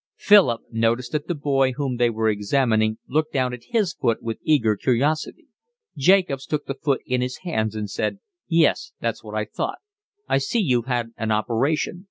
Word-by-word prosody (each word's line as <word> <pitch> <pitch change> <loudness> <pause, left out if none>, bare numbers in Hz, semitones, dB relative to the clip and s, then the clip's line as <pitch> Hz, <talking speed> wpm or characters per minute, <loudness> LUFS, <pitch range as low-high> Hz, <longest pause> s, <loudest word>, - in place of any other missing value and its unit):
Philip 195 - +5
noticed 115 +2 0
that 150 -1 -2
the 175 - -1
boy 135 -3 +1
whom 135 -2 -2
they 120 0 +3
were 110 -1 -1
examining 110 +1 +1
looked 155 +3 0
down 130 -2 0
at 125 - -9
his 215 -8 0
foot 115 -4 0
with 115 -1 -4
eager 115 -9 +2
curiosity. 135 +8 0 0.5
Jacobs 145 -3 +2
took 150 -1 -2
the 135 - -3
foot 140 0 -1
in 125 0 0
his 125 0 -3
hands 110 - -1
and 105 -1 -3
said: 100 - -2 0.3
"Yes, 170 - +2
that's - - -3
what - - -8
I - - -1
thought. - - -4 0.5
I - - +2
see 135 - -1
you've 125 - +1
had 120 -3 -1
an 110 -1 -2
operation. 125 +10 0
130 Hz, 185 wpm, -23 LUFS, 115-150 Hz, 0.5 s, Philip